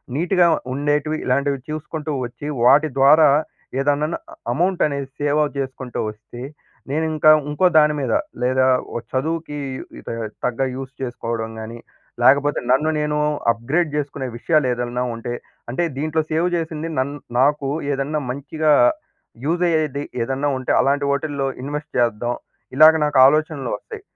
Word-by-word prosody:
నీట్‌గా 175 +3 +3 0.3
ఉండేటివి, 145 +2 0
ఇలాంటివి 140 +1 +1
చూసుకుంటూ 155 0 -5
వచ్చి 120 +4 -8 0.2
వాటి 140 +6 +6
ద్వారా 150 +3 +7 0.5
ఏదన్నన్న 145 +3 +1 0.4
అమౌంట్ 175 +6 0
అనేది 140 -2 -4
సేవ 145 +1 +1 0.2
చేసుకుంటూ 130 -2 -4
వస్తే 110 +3 -12 0.5
నేను 155 +3 0
ఇంకా, 155 0 +6 0.2
ఇంకో 150 +5 +1
దాని 150 0 +4
మీద 135 - -1 0.3
లేదా 130 +1 +2 0.3
ఓ - - +1
చదువుకి 155 +2 -2 0.9
తగ్గ 125 +1 -1
యూజ్ 135 0 -6
చేసుకోవడం 115 -3 -3
గానీ 115 +2 -7 0.4
లేకపోతే 140 +3 +4
నన్ను 135 +5 +3
నేను 150 0 -1 0.3
అప్‌గ్రేడ్ 140 +9 -1
చేసుకునే 140 -2 -3
విషయాలు 155 +2 +2
ఏదన్నా 120 +1 -2
ఉంటే 120 +1 -5 0.4
అంటే 130 +9 -1
దీంట్లో 155 +2 0
సేవ్ 165 +3 +2
చేసింది 160 -1 -3
నన్ను 140 +2 -2 0.2
నాకు 140 +1 +2 0.2
ఏదన్నా 140 +2 -1
మంచిగా 150 +3 -1 0.7
యూజ్ 170 +3 0
అయ్యేది 155 -4 0 0.2
ఏదన్నా 135 +4 -1
ఉంటే 130 - -2
అలాంటి 140 +1 +2
వాటిల్లో 140 -1 -1
ఇన్‌వెస్ట్ 145 +2 -5
చేద్దాం. 120 0 +1 0.4
ఇలాగ 155 +3 +8
నాకు 145 -2 0
ఆలోచనలు 150 -1 +2
వస్తాయి. 445 -3 -10
145 Hz, 130 wpm, -21 LUFS, 130-155 Hz, 0.9 s, ఇలాగ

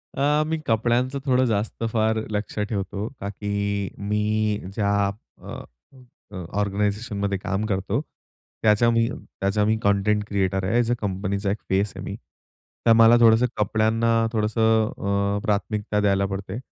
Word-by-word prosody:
अ, 145 +2 +2
मी 160 0 -1
कपड्यांचं 120 +4 +1
थोडं 130 -1 +3
जास्त 110 0 -2
फार 110 0 +2
लक्ष 105 +1 -4
ठेवतो 105 0 -3
का 100 - -4
की 105 0 -5 0.6
मी 105 0 +1 0.5
ज्या 100 -1 0 0.5
अ, - - -8 0.8
अ, 95 -2 -6 0.2
ऑर्गनायझेशनमध्ये 100 0 -1
काम 95 +2 -2
करतो. 95 -2 -1 0.6
त्याचा 110 +2 +4
मी 115 0 +2
त्याचा 100 -3 -2
मी 110 +1 +2
कंटेंट 100 +1 +2
क्रिएटर 95 -2 0
आहे, 110 +6 +1
एज 120 0 +1
ए - - +4
कंपनीचा 100 0 -2
एक 105 - -2
फेस 100 +2 +1
आहे - - -7
मी. - - -5 0.7
तर 115 - +7
मला 115 +1 +7
थोडंसं 115 +1 +6
कपड्यांना 110 +2 +1 0.2
थोडंसं 110 0 +2 0.5
अ, - - -2
प्राथमिकता 105 0 -1
द्यायला 100 -1 +2
पडते. 95 +1 -5
105 Hz, 145 wpm, -24 LUFS, 100-115 Hz, 0.8 s, तर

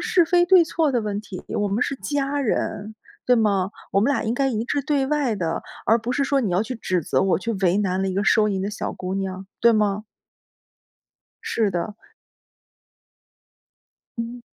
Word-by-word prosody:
是 350 -2 +4
非 350 +1 +3
对 365 -2 +7
错 320 -2 0
的 245 -3 +1
问 210 -2 -3
题， 195 -3 -9
我 205 - -1
们 205 +5 0
是 275 - -1
家 285 +1 -1
人， 215 -3 -2 0.3
对 250 -1 +5
吗？ 200 -4 +1 0.2
我 195 - +3
们 235 +7 +2
俩 - - 0
应 220 - 0
该 270 +1 +1
一 225 -2 -1
致 285 - -1
对 280 -1 +1
外 285 -5 +1
的， 165 -3 -2 0.2
而 225 +2 +4
不 230 +2 -4
是 275 +3 +1
说 275 0 +2
你 220 -7 -1
要 180 +4 +2
去 255 +3 -5
指 185 -6 -1
责 - - +1
我 190 -1 +2
去 230 +5 -3
为 190 -3 +1
难 190 -2 0
了 195 - 0
一 185 - -3
个 200 +2 0
收 215 -2 +4
银 190 -2 -1
的 200 - -2
小 210 - -4
姑 185 +1 -5
娘， 190 -1 -4
对 235 - +6
吗？ 210 -1 +1 1.4
是 220 -3 0
的。 180 +4 -3 2.2
嗯。 235 +1 -5
220 Hz, 210 characters per minute, -23 LUFS, 195-265 Hz, 2.2 s, 对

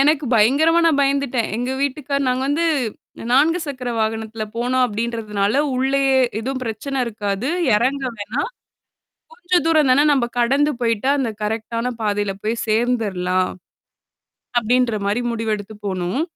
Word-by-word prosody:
எனக்கு 295 +1 +3
பயங்கரமா 285 +10 +4
நான் 310 -4 +3
பயந்துட்டேன். 275 -4 +1
எங்க 245 +2 -2
வீட்டுக்காரர் 280 0 -1
நாங்க 255 +1 0
வந்து 320 +4 +1 0.7
நான்கு 305 +7 +4
சக்கர 255 -4 -4
வாகனத்துல 220 0 -2
போனோம், 250 +2 +1
அப்பிடின்றதுனால 220 0 -1
உள்ளயே 270 +1 +2 0.3
எதுவும் 260 +2 -3
பிரச்சன 255 +4 -3
இருக்காது. 210 +2 -3 0.3
எறங்க 265 +5 0
வேணாம். 230 - -3 0.8
கொஞ்சம் 360 -8 0
தூரம் 310 -5 +4
தான 285 +3 +4
நம்ம 265 -4 +2
கடந்து 275 +5 +3
போயி்ட்டா 230 +2 +1
அந்த 250 -4 0
கரெக்ட்டான 230 +3 -2
பாதையில 205 -2 0
போய் 220 +2 -1
சேர்ந்துர்லாம். 210 -6 0 1.1
அப்பிடின்ற 240 0 +2
மாரி 210 +5 0
முடிவெடுத்து 220 -2 -3
போனோம். 185 - -1
245 Hz, 125 wpm, -20 LUFS, 220-275 Hz, 1.1 s, பயங்கரமா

